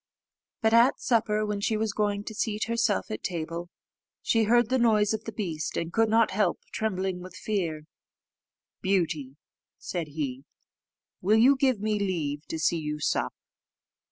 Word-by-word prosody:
But 220 0 +3
at 235 +3 +5
supper, 215 -3 +1
when 210 -1 -2
she 220 +1 +1
was 215 -1 -1
going 205 -1 0
to 220 - -7
seat 215 0 -1
herself 230 -2 0
at - - -4
table, 170 0 -4 0.5
she 225 -1 +3
heard 240 +1 +4
the 260 0 +2
noise 215 -3 +3
of 220 0 -4
the 225 - -4
beast, 165 -9 -3
and 170 0 -3
could 225 -1 +3
not 225 +1 +4
help 205 +2 +1
trembling 190 -4 -2
with 185 0 -10
fear. 170 -8 -2 1.0
"Beauty," 165 -8 0 0.4
said 170 -4 -4
he, 140 -3 -4 0.8
"will 210 +4 +4
you 255 +5 +6
give 260 -4 +2
me 210 0 0
leave 160 -7 -2
to 160 - -4
see 165 +1 +1
you 150 -1 -4
sup?" - - 0
205 Hz, 160 wpm, -27 LUFS, 170-220 Hz, 1.0 s, you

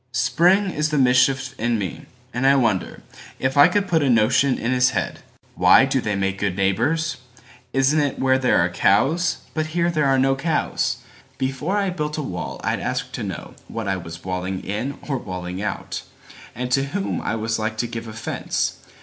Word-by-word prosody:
Spring 185 +7 +3
is 155 -1 0
the 150 - 0
mischief 130 +1 +3
in 120 0 +1
me, 100 -3 -5 0.3
and 125 +2 +1
I 135 - +7
wonderIf 130 +3 -2
I 145 +2 +8
could 200 +3 0
put 165 -3 +2
a 140 - +2
notion 120 +4 +3
in 120 - -1
his 125 0 +4
head:"Why - - +2
do - - 0
they 105 - -1
make 95 0 -1
good 100 -2 -1
neighbors? 120 +12 +1 0.5
Isn't 140 +1 +2
itWhere 130 0 +2
there 125 - +3
are - - -1
cows? 135 - +2
But 155 -1 -1
here 170 0 +2
there 155 -3 +1
are 135 0 +3
no 135 +1 +3
cows. 160 +4 -1 0.3
Before 135 +9 -1
I 200 -2 0
built 150 -3 -3
a 150 - -2
wall 90 -9 -5
I'd - - 0
ask 125 0 -3
to - - -5
knowWhat 105 +2 -6
I 95 -1 0
was 85 -1 -9
walling 95 0 -3
in 115 +8 -3
or 135 -3 -1
walling 90 -1 -5
out, 105 - -4 0.5
And 125 +1 -4
to 135 +2 +2
whom 195 +8 -3
I - - -2
was 115 +1 -2
like 110 0 -2
to 120 - 0
give 115 -1 -6
offence. 110 0 -3
130 Hz, 185 wpm, -22 LUFS, 105-150 Hz, 0.5 s, I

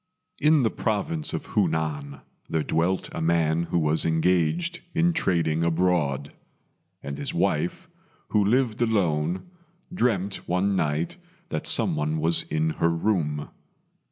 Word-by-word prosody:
In 150 -1 +4
the 110 - +2
province 155 +9 -1
of - - -5
Hunan 75 - -1 0.3
there 80 -1 0
dwelt 85 +5 0
a - - -4
man 80 0 +2
who 85 - -1
was 80 -1 +1
engaged 90 - +1 0.2
in 170 +1 +3
trading 85 - +1
abroad; 80 -5 0 0.7
and 70 0 -5
his - - -4
wife, - - 0 0.4
who 105 - +3
lived 115 +1 +1
alone, 90 -7 +1 0.5
dreamt 100 - -1
one 95 +3 +1
night 80 -1 -1 0.3
that - - -3
some - - +3
one 75 +1 -1
was 80 +2 +3
in 80 +1 -1
her 85 - +4
room. 80 -4 -1
85 Hz, 130 wpm, -25 LUFS, 80-105 Hz, 0.7 s, In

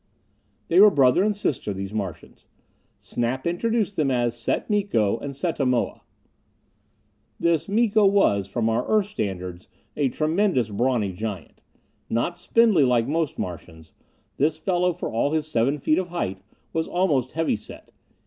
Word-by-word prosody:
They 170 - +4
were 210 +1 +9
brother 140 0 +4
and 210 0 +1
sister, 140 - -2
these 95 +1 -6
Martians. 100 -5 -6 0.5
Snap 120 +2 -3
introduced 205 +4 -1
them 150 -3 +2
as 120 -2 0
Set 120 - -2
Miko 195 - +1
and 140 -1 -6
Setta 155 0 -2
Moa. 125 -2 0 1.4
This 165 -1 +1
Miko 215 -1 +3
was, 105 - +2
from 110 +3 -1
our 115 +2 +1
Earth 215 -2 +3
standards, 95 - -5 0.3
a 145 -3 +1
tremendous, 155 - +1
brawny 110 -2 0
giant. 100 -3 -6 0.5
Not 120 +10 -1
spindly, 220 -6 +3
like 125 -2 +2
most 160 +1 -1
Martians, 80 -2 -7 0.5
this 150 +3 +1
fellow, 180 +1 +1
for 175 - -5
all 130 +6 0
his 155 -2 0
seven 135 -1 0
feet 155 +3 +1
of 185 - -3
height, 135 - -4 0.3
was 160 0 -1
almost 145 -9 0
heavy 165 -3 0
set. - - -12
140 Hz, 150 wpm, -24 LUFS, 115-175 Hz, 1.4 s, were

